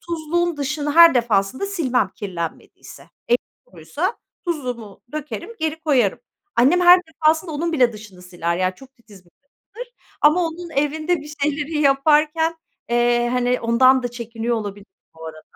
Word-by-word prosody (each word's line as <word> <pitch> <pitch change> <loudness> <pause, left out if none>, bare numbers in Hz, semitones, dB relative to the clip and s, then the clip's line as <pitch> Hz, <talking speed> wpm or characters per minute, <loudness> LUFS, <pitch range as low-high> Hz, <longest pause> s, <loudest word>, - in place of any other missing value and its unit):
tuzluğun 340 0 -2
dışını 295 +1 -2
her 335 -3 +8
defasında 235 - 0
silmem 260 - 0
kirlenmediyse. 175 -5 -8 0.2
Elim 240 +1 +4 0.3
kuruysa 285 - -4 0.3
tuzluğumu 250 - -5
dökerim, 305 +6 -6
geri 320 0 -3
koyarım. 260 -11 +1 0.4
Annem 280 +10 +4
her 355 +1 +7
defasında 320 +1 0
onun 335 +3 -2
bile 250 -6 +3
dışını 210 -4 -13
siler. 175 -1 -3
Yani, 185 0 -1
çok 270 +5 -17
titiz 210 -7 -18
bir 175 - -26
kadındır 475 +12 -14 0.3
ama 305 +4 +4
onun 340 +1 -8
evinde 310 +4 0
bir 300 +1 -10
şeyleri 300 +1 -1
yaparken, 305 +3 +2 0.3
eee, 240 0 +2
hani, 250 0 0
ondan 255 +3 +4
da 245 - -2
çekiniyor 235 0 -4
olabilirim 205 -2 -7 0.2
bu 160 0 -12
arada. 155 -1 -10
275 Hz, 145 wpm, -21 LUFS, 230-320 Hz, 0.4 s, her